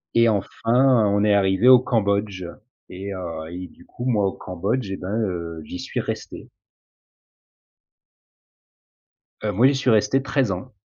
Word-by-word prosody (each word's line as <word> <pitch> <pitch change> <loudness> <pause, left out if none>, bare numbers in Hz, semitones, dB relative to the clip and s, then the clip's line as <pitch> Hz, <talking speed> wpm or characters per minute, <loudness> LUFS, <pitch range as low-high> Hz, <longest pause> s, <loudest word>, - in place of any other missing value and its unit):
Et 115 0 +5
enfin, 115 +3 +2
on 100 0 +2
est 105 -1 +3
arrivé 95 +2 +2
au 130 -1 +9
Cambodge 100 -5 -1 0.4
et 100 +2 -6
heu, 85 -4 -6
et 90 +1 -7
du - - -20
coup, 120 - -8
moi, 110 -6 +2
au 95 - -3
Cambodge 95 +5 -3
et 95 - -3
ben, 90 +2 -6
heu, 85 -4 -4
j'y 90 - -7
suis - - -4
resté. - - -7 2.9
Heu, 105 - 0
moi, 115 +7 +5
j'y 140 - +2
suis 130 -1 0
resté 110 +4 +3
13 135 -4 0
ans. 90 0 -6
100 Hz, 155 wpm, -22 LUFS, 95-120 Hz, 2.9 s, au